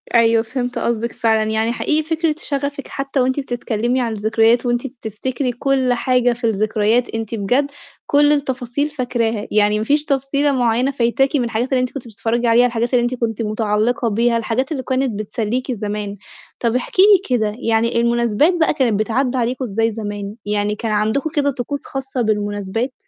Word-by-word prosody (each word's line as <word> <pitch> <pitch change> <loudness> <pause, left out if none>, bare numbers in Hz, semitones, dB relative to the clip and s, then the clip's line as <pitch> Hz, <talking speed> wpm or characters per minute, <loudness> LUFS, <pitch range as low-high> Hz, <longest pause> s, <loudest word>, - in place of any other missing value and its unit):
أيوه، 230 -1 +4
فهمت 245 +1 -3
قصدِك 235 0 -1
فعلًا، 220 -1 +2
يعني 220 +1 +1
حقيقي 305 +6 0
فكرة 320 0 0
شغفِك 280 0 -3
حتّى 275 0 -3
وأنتِ 260 +2 +1
بتتكلّمي 245 -1 -1
عن 235 -2 -1
الذكريات، 225 +3 +2
وأنتِ 240 +2 0
بتفتكري 250 +2 -4
كُلّ 260 0 +1
حاجة 245 0 +2
في 240 +1 -14
الذكريات، 215 +2 +1
أنتِ 225 0 -3
بجد 250 +8 0 0.4
كُلّ 290 0 +4
التفاصيل 270 -1 -1
فاكراها، 240 -6 -2
يعني 210 0 +3
ما 215 - -2
فيش 295 +4 +1
تفصيلة 280 +1 +1
مُعيّنة 250 0 +1
فايتاكِ 270 +2 +1
من 265 - +2
الحاجات 235 +2 -1
اللي 255 - +3
أنتِ 255 - -2
كنتِ 265 -4 -7
بتتفرّجي 230 +2 -1
عليها، 235 +2 +5
الحاجات 235 0 -1
اللي 245 - +4
أنتِ 240 +1 -1
كنتِ 230 -2 -2
مُتعلقة 220 +3 0
بيها، 230 +2 +2
الحاجات 230 +5 -1
اللي 270 -4 -2
كانت 260 -4 -1
بتسليكِ 230 +4 -2
زمان، 205 -2 -4 0.4
طب 235 -1 0
احكي 255 +8 +1
لي 385 -10 +5
كده 215 -2 -1
يعني 230 +1 +2
المُناسبات 235 - +2
بقى 320 - +3
كانت 240 -8 +1
بتعدى 245 +4 0
عليكم 250 +2 -1
إزاي 225 +1 0
زمان، 205 -2 -5
يعني 205 0 0
كان 225 +1 -3
عندكم 220 +8 0
كده 285 -1 +2
طقوس 275 +2 -4
خاصة 270 -1 -3
بالمُناسبات؟ 210 +2 -1
240 Hz, 175 wpm, -19 LUFS, 220-265 Hz, 0.4 s, عليها